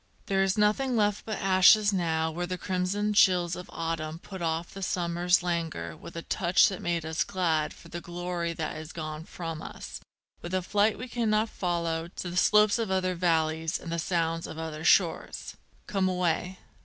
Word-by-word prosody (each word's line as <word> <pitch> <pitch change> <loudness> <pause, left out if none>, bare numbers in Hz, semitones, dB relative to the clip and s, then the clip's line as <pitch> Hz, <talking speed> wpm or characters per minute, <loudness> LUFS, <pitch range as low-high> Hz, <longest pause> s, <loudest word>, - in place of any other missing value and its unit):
There 195 -1 +1
is 195 +1 +1
nothing 215 +5 +2
left 205 -2 +1
but 215 - -2
ashes 195 +2 +5
now 160 -3 0
where 175 +2 -3
the 185 +1 -3
crimson 190 +4 -1
chills 180 -3 +4
of 180 - -9
autumn 160 -1 -3
Put 190 +2 -9
off 165 0 -2
the 195 - -8
summer's 175 -1 +1
languor 165 - -2
with - - -11
a 165 - -5
touch 180 -2 +3
that 190 - -6
made 170 -2 -1
us 160 +1 0
glad 170 -6 0
For - - -14
the 170 +1 -6
glory 175 -1 -3
that 160 -2 -4
is 155 0 -8
gone 155 -1 -5
from 165 -3 -6
us, - - -8 0.4
with 175 +2 -4
a 185 - 0
flight 205 +3 +2
we 250 - -6
cannot 225 -2 +1
follow, 170 -2 -2
To 175 0 -6
the - - -6
slopes 210 +3 +4
of 225 -3 -1
other 185 -1 +1
valleys 160 -2 0
and 165 - -7
the 170 - -1
sounds 165 -1 -1
of - - -8
other 160 -1 -5
shores. 170 0 +2 0.3
_Come 190 -2 +1
away! 180 0 -1
175 Hz, 190 wpm, -28 LUFS, 165-190 Hz, 0.4 s, ashes